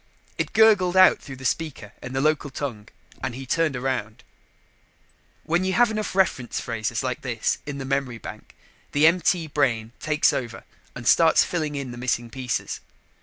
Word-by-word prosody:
It - - -2
gurgled 205 -5 +5
out 185 - +7
through 135 - -9
the 130 0 -11
speaker 130 -8 -3
in 125 - -7
the 135 - 0
local 155 -1 +1
tongue 125 -6 -5 0.4
and 130 -2 -3
he 135 +1 -7
turned 160 +1 +1
around. 125 -4 -3 1.2
When 170 +3 +1
you 190 0 0
get 240 +3 +4
enough 215 -3 -3
reference 155 - +1
phrases 115 0 -3
like 125 -1 -3
this 120 -4 -1
in 140 -1 -4
the 135 - -5
memory 135 -3 -1
bank, - - -10 0.4
the 145 +2 +4
MT 170 0 +3
brain 125 -7 0
takes 155 0 +2
over 120 -3 -4 0.3
and 120 -1 -6
starts 165 -1 +6
filling 155 -4 -2
in 135 -3 -4
the 120 - -8
missing 120 -2 -1
pieces. 130 -1 -3
135 Hz, 170 wpm, -24 LUFS, 125-165 Hz, 1.2 s, out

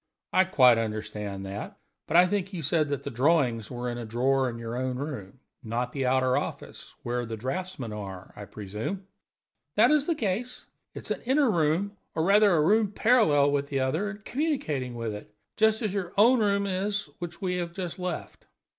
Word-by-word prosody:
"I 185 - +5
quite 125 -10 +5
understand 105 -3 -4
that. 100 +1 -6 0.3
But 170 - +3
I 180 - +8
think 195 +1 -2
you 170 -4 -4
said 155 0 +2
that 140 -1 -2
the 140 - -5
drawings 125 -4 +2
were 125 0 -4
in 120 0 -3
a 120 - -5
drawer 130 +3 +1
in 115 - -6
your 115 0 -5
own 130 0 -2
room 130 -6 -6 0.2
not 120 +2 -2
the 135 -2 -1
outer 130 0 +2
office, - - -5
where 120 0 -2
the 115 -1 -5
draughtsmen 135 - -4
are, 95 -3 -8
I 105 - -8
presume?" 110 - -5 0.7
"That - - +5
is 300 -1 +3
the 335 - +1
case. 235 +1 -3 0.3
It - - -6
is - - -5
an - - -2
inner 265 0 +3
room, 175 +5 0 0.2
or, 160 - +1
rather, 205 +3 +5
a 155 - +3
room 210 +4 +3
parallel 180 - +4
with 140 0 0
the 135 -2 -1
other, 160 +11 0
and 210 0 -10
communicating 155 - -2
with 115 -2 -3
it; 105 0 -9 0.2
just 220 +1 +3
as 210 -3 -1
your 190 -3 -3
own 235 +5 +6
room 200 -2 +2
is, 200 +2 -1
which 175 -2 -6
we 180 -2 -1
have 170 -1 -3
just 180 -1 -5
left." 180 -3 -5
150 Hz, 200 wpm, -27 LUFS, 120-200 Hz, 0.7 s, I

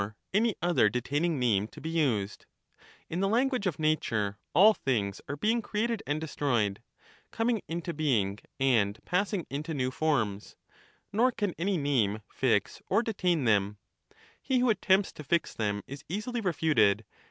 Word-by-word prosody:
any 220 +1 +2
other 175 -11 +4
detaining 145 +7 -1
name 110 -5 +2
to - - -13
be - - -6
used; 120 -11 -1 0.6
in 170 - -3
the 195 - +2
language 245 -1 +1
of 170 - -2
nature 110 -10 0 0.2
all 205 +6 +8
things 105 - -2
are 145 - -2
being 225 +10 +1
created 220 +1 -1
and 145 +1 0
destroyed, 120 -10 -1 0.5
coming 225 -2 0
into 170 +1 -4
being 110 -11 0 0.2
and 110 -6 +2
passing 190 0 0
into 150 +3 -3
new 130 -2 -1
forms; 120 -10 -1 0.6
nor 240 +5 +3
can 205 -6 -2
any 190 +2 +1
name 115 -8 0
fix 120 -6 0
or 230 - +3
detain 180 - 0
them; 105 -2 +2 0.6
he 260 - 0
who 245 -1 +3
attempts 195 -2 +2
to 150 - -10
fix 170 +4 0
them 105 -2 -2
is 140 +1 -9
easily 230 +6 -3
refuted. 150 - +2
155 Hz, 155 wpm, -29 LUFS, -, 0.6 s, all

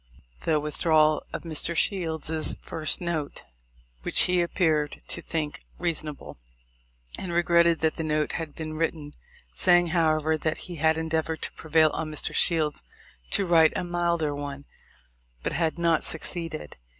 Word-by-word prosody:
the 155 -2 +2
withdrawal 155 0 +2
of - - -5
Mr. 165 +1 -2
Shields's 160 -3 +1
first 155 0 -1
note, 165 -4 -3 0.6
which - - +3
he 180 -1 +3
appeared 160 -4 0
to - - -1
think 155 -3 -4 0.2
reasonable, 155 - -4 0.8
and 185 - -5
regretted 170 -1 +3
that 160 -1 +1
the 160 - -2
note 150 -1 0
had 160 -3 -5
been 155 -1 -5
written, 155 -2 -3 0.4
saying 175 -1 +4
however, 160 -2 +1
that 155 +1 -1
he 175 -2 -7
had 160 +1 +2
endeavored 160 0 -2
to - - +3
prevail 160 -1 +2
on 160 -1 -3
Mr. 155 - -2
Shields 155 -4 +2 0.5
to 200 - +2
write 165 -2 +4
a - - -2
milder 170 -3 0
one, 145 -1 -6 0.8
but - - -2
had 165 -1 0
not 170 -2 +2
suc 160 - 0
ceeded. 165 -3 -3
160 Hz, 150 wpm, -26 LUFS, 155-170 Hz, 0.8 s, saying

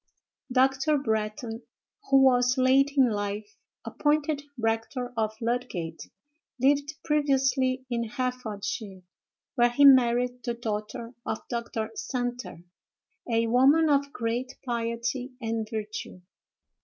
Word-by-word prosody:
Dr. 270 +3 +3
Bretton, 220 -1 -2 0.5
who 270 0 +6
was, 250 -1 +4
late 270 +2 +4
in 255 -4 +5
life, 205 0 -4 0.3
appointed 295 0 0 0.2
rector 230 +2 -2
of 220 -1 -1
Ludgate, 225 -9 -3 0.5
lived 285 +3 +2
previously 265 -3 +1
in 235 -2 -2
Herefordshire, 220 -5 -4 0.5
where 240 0 +4
he 285 +4 +4
married 250 -2 +5
the 240 -2 -2
daughter 230 +1 -5
of 220 - -5
Dr. 230 -2 -3
Santer, 245 -7 -4 0.7
a 230 0 +2
woman 275 +7 +4
of 280 0 +2
great 245 +2 -3
piety 235 +2 -2
and 225 -2 -3
virtue. 215 -4 -6
245 Hz, 105 wpm, -27 LUFS, 225-265 Hz, 0.7 s, who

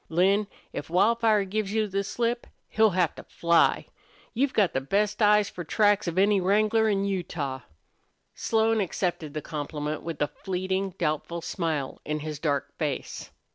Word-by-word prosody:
"Lin, 195 +5 +3 0.3
if 145 - -5
Wildfire 215 +3 +3
gives 200 +1 -2
you 220 0 +1
the 195 0 -1
slip 235 +4 -2 0.2
he'll 220 0 +4
have 180 -4 +1
to - - -11
fly. 170 -1 +2 0.5
You've 265 +3 +1
got 205 -7 +2
the 135 - 0
best 210 - 0
eyes 210 -1 +5
for 175 - -7
tracks 205 +3 +2
of 170 +1 -3
any 200 0 +4
wrangler 215 +4 +3
in 200 -1 +1
Utah." 165 -8 -3 0.7
Slone 225 -1 +1
accepted 175 -4 -2
the 155 - -3
compliment 150 0 -4
with 165 -3 -6
a 150 - +2
fleeting, 190 +1 -3
doubtful 165 +1 -2
smile 155 -5 -3
on 150 0 -3
his 155 -1 -5
dark 145 -3 -1
face. - - -3
190 Hz, 160 wpm, -27 LUFS, 160-210 Hz, 0.7 s, eyes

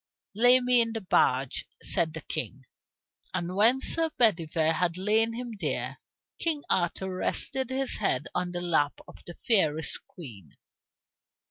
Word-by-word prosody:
"Lay 245 +4 +6
me 250 -1 +4
in 230 -1 0
the 225 - -4
barge," 135 -8 +1
said 160 -1 +2
the 160 - -6
King. 135 -4 -5 0.7
And 175 +1 -3
when 235 +6 +4
Sir 325 -1 +1
Bedivere 165 -8 +2
had 180 0 -1
laid 220 +4 +1
him 245 0 -6
there, 135 -3 -3 0.4
King 310 -3 +1
Arthur 185 +1 -1
rested 265 +6 -2
his 265 0 -1
head 145 -10 0
on 180 0 -2
the 175 0 -4
lap 160 -4 0
of - - -14
the 175 - -9
fairest 160 - 0
queen. 110 - -12
180 Hz, 145 wpm, -27 LUFS, 160-235 Hz, 0.7 s, Lay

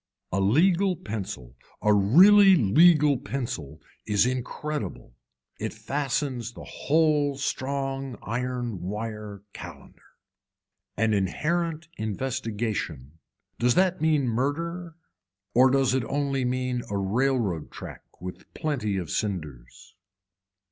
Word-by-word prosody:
A 100 - 0
legal 175 - +3
pencil 95 - -6 0.2
a 105 - +3
really 190 - +7
legal 150 - +5
pencil 80 - -5 0.3
is 105 +1 +3
incredible, 130 - -4 0.5
it - - -3
fastens 135 -3 -2
the - - -10
whole 150 -2 +1
strong 135 -2 -3
iron 120 -4 -3
wire 105 +1 -5
calender. 85 -5 -11 1.0
An 110 +1 +2
inherent 155 - -1
investigation, 110 - -3 0.4
does 120 0 +3
that 185 -3 +2
mean 155 -4 +2
murder 165 +8 -2 0.6
or 130 +2 +6
does 135 -1 +2
it 130 -2 +1
only 140 -2 -1
mean 125 0 -1
a 100 - -1
railroad 105 - 0
track - - -9 0.2
with 90 +1 -9
plenty 125 -11 -1
of 90 -4 -4
cinders. 75 - -5
125 Hz, 105 wpm, -26 LUFS, 105-145 Hz, 1.0 s, really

